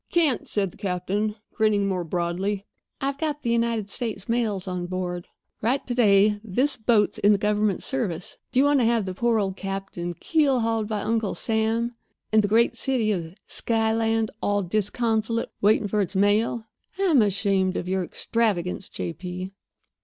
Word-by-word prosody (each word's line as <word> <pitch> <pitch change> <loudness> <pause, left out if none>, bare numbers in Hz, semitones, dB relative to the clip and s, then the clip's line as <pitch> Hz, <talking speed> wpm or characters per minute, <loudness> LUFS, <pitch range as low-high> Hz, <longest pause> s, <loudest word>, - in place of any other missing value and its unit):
"Can't," 315 -8 +2
said 195 -3 +1
the - - -18
captain, 200 +2 -1 0.2
grinning 210 -3 +2
more 185 -2 -1
broadly. 180 +4 -2 0.3
"I've 275 0 -2
got 300 -2 -2
the 235 - 0
United 230 -3 0
States 220 -5 -3
mails 220 -5 0
on 180 -1 -3
board. 180 -1 -4 0.3
Right 260 +5 0
to 245 - -2
day 210 -3 +4
this 255 +8 +1
boat's 220 -3 +2
in 205 +1 +5
the - - +3
government 210 -1 +1
service. 195 -10 -3
Do 255 - +2
you - - +6
want 285 -1 +4
to 240 - +3
have 230 -3 +2
the 185 - -4
poor 235 +4 +1
old 195 -2 -1
captain 195 -3 -4
keelhauled 235 - +1
by 210 -1 -2
Uncle 225 -2 0
Sam? 225 +1 0 0.4
And 220 - +6
the 205 - 0
great 230 +3 +3
city 250 -6 +1
of 170 -3 -3
Skyland, 225 -1 +1
all 205 0 +1
disconsolate, 220 +4 0
waiting 210 +1 +3
for 210 +1 +1
its 195 0 -3
mail? 210 +3 +2 0.3
I'm 355 -10 +4
ashamed 195 -2 +1
of 180 - -4
your 190 0 0
extravagance, 195 -2 -1
J. 170 - -4
P." 180 +3 -6
210 Hz, 170 wpm, -25 LUFS, 190-230 Hz, 0.4 s, you